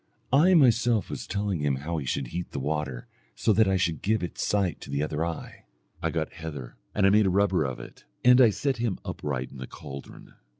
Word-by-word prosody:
I 175 +7 +6
myself 120 - +3
was - - -5
telling 100 -3 -1
him 70 -2 +1
how 80 +5 -3
he 70 - -6
should 65 -1 -2
heat 90 +4 -5
the - - -2
water, 70 -3 -3 0.3
so 110 - +2
that 110 +1 +4
I 95 0 +2
should 85 -4 0
give 110 +2 +1
its 90 - -4
sight 100 -5 0
to - - -10
the 70 +1 -1
other 75 +1 -2
eye. 85 -1 -6 0.4
I - - 0
got 80 -2 -3
heather 75 -7 -7 0.2
and 100 - +3
I - - +7
made 105 -1 +5
a - - +3
rubber 95 -3 +2
of 65 -3 -4
it, - - -12 0.2
and 125 +1 +8
I 120 - +7
set 130 +7 -1
him 115 -5 -1
upright 65 -3 -4
in - - -11
the 65 - -6
caldron. 70 -2 -10
85 Hz, 225 wpm, -27 LUFS, 75-105 Hz, 0.4 s, and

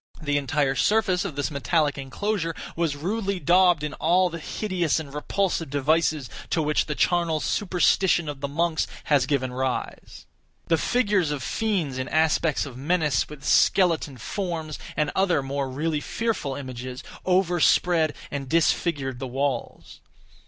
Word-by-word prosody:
The 145 -2 0
entire 140 0 0
surface 190 - +2
of 165 -8 -4
this 145 +2 -2
metallic 145 +1 +1
enclosure 165 - -2 0.2
was 165 -3 0
rudely 195 +5 -2
daubed 175 -3 +4
in 150 0 -3
all 180 +3 +2
the 165 - -5
hideous 175 -3 -1
and 140 -3 -8
repulsive 170 +1 -1
devices 150 0 +1 0.2
to 170 - 0
which 150 0 +1
the 150 - -2
charnel 170 -2 +1
superstition 180 -2 +2
of 145 -2 -6
the 140 - -1
monks 160 +3 0 0.2
has 140 -4 +2
given 130 -3 0
rise. 130 0 -4 0.4
The 165 -2 +3
figures 205 -8 +1
of 145 -4 -3
fiends 180 - -1
in 130 - -3
aspects 160 0 +2
of 130 -3 -9
menace, 150 -1 +1
with 150 -2 -11
skeleton 165 -7 +3
forms, 160 - -4 0.2
and 150 -1 +1
other 180 -7 +2
more 135 0 -2
really 150 +4 -1
fearful 220 -13 -2
images, 130 -1 -7 0.2
overspread 175 -3 +3 0.2
and 140 -2 -4
disfigured 150 -5 +1
the 135 - -4
walls. 135 -1 -3
155 Hz, 145 wpm, -25 LUFS, 140-175 Hz, 0.4 s, daubed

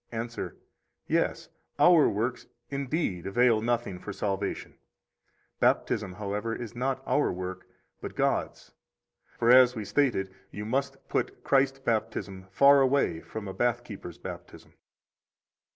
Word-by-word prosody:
Answer: 115 0 -5 0.5
Yes, - - 0 0.3
our 175 -3 +6
works, 115 +5 -2 0.2
indeed, 140 - -2
avail 115 +1 +3
nothing 115 -5 -1
for 100 - -7
salvation; 100 0 -3 0.9
Baptism, 100 -3 +1
however, 105 +3 -3
is 120 -2 -7
not 130 +2 -2
our 145 - +2
work, 90 0 -6 0.3
but - - -7
God's - - -1 0.6
(for, 120 0 +4
as 125 0 +7
was 105 -3 -5
stated, 100 -7 +1 0.2
you 105 - -6
must 135 +4 -1
put - - -2
Christ 135 -1 +2
baptism 105 -4 -2
far 140 +5 +6
away 135 -10 +2
from 110 +4 -7
a 95 - -5
bath 120 +2 0
keeper's 95 -7 -9
baptism). - - -10
115 Hz, 125 wpm, -28 LUFS, 100-130 Hz, 0.9 s, as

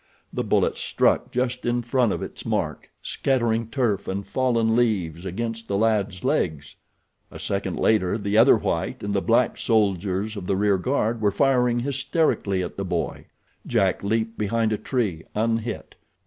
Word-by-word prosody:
The - - -1
bullet - - +1
struck - - +1
just 125 0 -1
in 120 0 0
front 120 -2 +2
of - - -3
its - - -8
mark, - - -2
scattering 115 -4 0
turf 115 -5 -1
and 100 +1 -3
fallen 115 -4 +1
leaves 95 -8 0
against 115 +4 -4
the 100 - 0
lad's 105 -4 0
legs. 75 -2 -1 0.5
A - - -10
second - - -2
later 105 -3 +2
the 100 -1 -2
other 115 +5 +7
white - - -2
and 100 0 -2
the 100 - +1
black 115 +3 +2
soldiers 100 -1 +1
of 95 -3 -6
the 95 - +1
rear 100 -1 +2
guard 115 0 0
were 105 - +3
firing 125 0 +2
hysterically 130 - 0
at 90 - -7
the 100 - -2
boy. 90 -3 -3 0.4
Jack 95 0 +1
leaped 110 +2 -1
behind 110 +1 +1
a - - 0
tree, 105 - -2
unhit. 115 +1 -2
110 Hz, 160 wpm, -24 LUFS, 100-120 Hz, 0.5 s, other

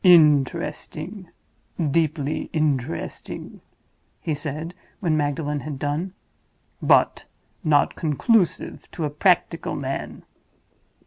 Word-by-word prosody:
"Interesting, 165 +3 +3 0.5
deeply 155 -1 0
interesting," 140 - -2 0.6
he 160 - -2
said, 155 +3 -4 0.3
when 165 -5 +1
Magdalen 145 0 0
had 145 -1 -5
done. 150 +7 -2 0.7
"But - - +4 0.4
not 150 -3 +3
conclusive 170 - +1
to 165 - -2
a 145 - -2
practical 165 +1 +2
man. 135 -1 -4
155 Hz, 85 wpm, -24 LUFS, 145-170 Hz, 0.7 s, But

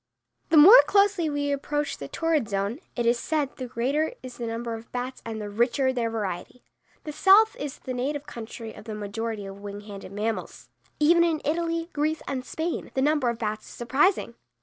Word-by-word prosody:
The 325 - +4
more 390 +12 +11
closely 400 -5 +3
we 290 -1 -1
approach 290 +1 -2
the 140 - -6
torrid 315 - 0
zone, 200 +5 -2 0.2
it 240 - -1
is 235 +1 +3
said, 295 -2 -1
the 255 - -5
greater 270 - 0
is 255 -1 -9
the 235 - -4
number 230 +1 -3
of 225 0 -9
bats 250 +1 -4
and 225 -1 -5
the 210 - -5
richer 240 +5 +1
their 235 -2 -1
variety. 215 +1 -5 0.4
The 305 - -5
South 395 +8 +5
is 285 -2 -5
the 255 - -6
native 280 +4 -2
country 230 -4 -8
of - - -12
the 220 -2 -5
majority 210 +1 -4
of 195 0 -9
wing 205 0 -7
handed 200 -1 -9
animals. 220 +1 -4 0.3
Even 340 +3 +5
in 330 -2 +1
Italy, 330 +1 -1
Greece, 310 +2 -1
and 260 -2 -3
Spain, 320 +5 -4
the 265 - +2
number 295 -4 +2
of 235 - -2
bats 215 -1 -4
is - - -11
surprising. 265 +4 +1
255 Hz, 195 wpm, -26 LUFS, 225-305 Hz, 0.4 s, more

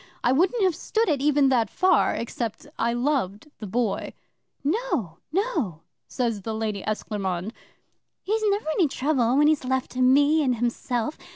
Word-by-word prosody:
I 245 - +3
wouldn't 370 - +2
have 370 -2 +3
stood 445 +6 -1
it 285 -4 +1
even 290 -1 +3
that 240 -4 +2
far 370 0 +3
except 230 -1 -4
I 235 - +2
loved 240 -2 -1
the 215 - -6
Boy. 225 +1 -1 0.5
'"No! 295 - -1
No!" 315 - -1 0.3
says 230 -5 -2
the 220 +3 -4
Lady 215 -2 -3
Esclairmonde. 200 -2 -3 0.7
"He's 435 +3 0
never 405 -3 -1
any 330 0 +3
trouble 265 -3 +1
when 295 - +5
he's 305 -2 +3
left 260 0 -1
to 255 - -3
me 285 +5 +5
and 255 -4 +1
himself. 240 +2 -2
255 Hz, 160 wpm, -25 LUFS, 225-310 Hz, 0.7 s, when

